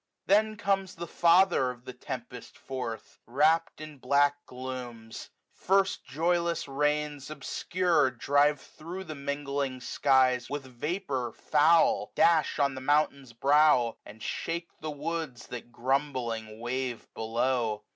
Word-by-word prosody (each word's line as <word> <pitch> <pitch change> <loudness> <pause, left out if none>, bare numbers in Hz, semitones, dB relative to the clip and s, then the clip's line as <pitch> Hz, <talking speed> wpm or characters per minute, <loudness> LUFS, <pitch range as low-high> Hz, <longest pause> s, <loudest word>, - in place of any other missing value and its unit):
Then 215 +2 +3
comes 195 -2 -1
the 170 - -5
father 170 -5 +4
of 125 0 -9
the 130 - -7
tempest 125 -1 -8
forth^ 125 -5 -6
Wrapt 155 +7 +2
in 155 -2 -9
black 145 +1 +2
glooms. 125 -3 -7 0.4
Rrst 195 +1 +2
joyless 170 +2 0
rains 150 0 -1
obsdd^ 155 -2 0
Drive 145 +3 +3
thro' 175 +4 -9
the 155 -4 -7
mingling 140 -2 -3
skies 130 -1 +2
with 145 -1 -4
vapour 135 -1 -3
foul; 160 +3 +3
Dash 165 -2 +3
on 140 -2 +2
the 130 - -7
mountain's 140 -2 +1
brow, 135 -2 +4
and 105 +1 -12
shake 170 +1 -3
the 155 0 -4
W0b3s, 150 -3 -5
That 120 0 -8
grumbling 120 -4 -2
wave 125 0 -3
below. 115 -1 -1
140 Hz, 125 wpm, -29 LUFS, 125-155 Hz, 0.4 s, father